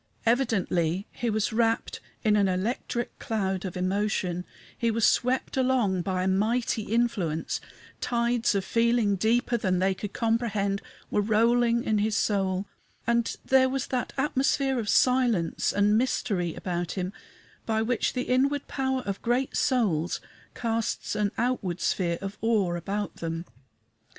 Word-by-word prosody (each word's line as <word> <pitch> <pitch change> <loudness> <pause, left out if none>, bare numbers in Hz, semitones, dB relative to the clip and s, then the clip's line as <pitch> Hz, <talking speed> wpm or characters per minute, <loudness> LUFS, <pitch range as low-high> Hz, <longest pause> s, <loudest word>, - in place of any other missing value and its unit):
Evidently 200 -7 +1
he 240 - -2
was 215 0 0
wrapped 225 0 +1 0.2
in 215 -2 +4
an 200 -2 +3
electric 225 +5 -2
cloud 195 -4 -1
of 185 -1 -4
emotion; 185 -1 -1 0.3
he 235 - 0
was 225 0 +2
swept 250 +1 +1
along 250 -8 +2
by 185 0 -1
a - - 0
mighty 220 +4 +1
influence 205 -8 -1 0.4
tides 235 -2 +1
of 195 -1 0
feeling 230 -3 +2
deeper 235 +4 +1
than 185 -4 0
they 190 +1 +2
could 205 +2 -6
comprehend 220 -4 0 0.3
were 210 - +2
rolling 235 +3 +3
in 215 -1 +1
his 210 0 +1
soul, 195 -2 0 0.4
and 235 0 +1
there 260 0 +4
was 265 -1 -1
that 250 -2 -2
atmosphere 270 -1 +1
of 215 -3 -3
silence 245 -9 +2
and 205 +2 +3
mystery 190 -9 -1
about 175 -2 -3
him 185 0 -3 0.5
by 220 -1 +1
which 235 0 0
the 250 - -1
inward 275 +3 +1
power 265 -1 -1
of 200 -1 -3
great 245 +3 0
souls 190 - +1 0.4
casts 230 -1 -2
an 205 -1 0
outward 225 -7 -1
sphere 170 -3 0
of 195 +1 -6
awe 215 -6 +2
about 195 +4 -3
them. 165 +1 -4
220 Hz, 145 wpm, -27 LUFS, 190-240 Hz, 0.5 s, in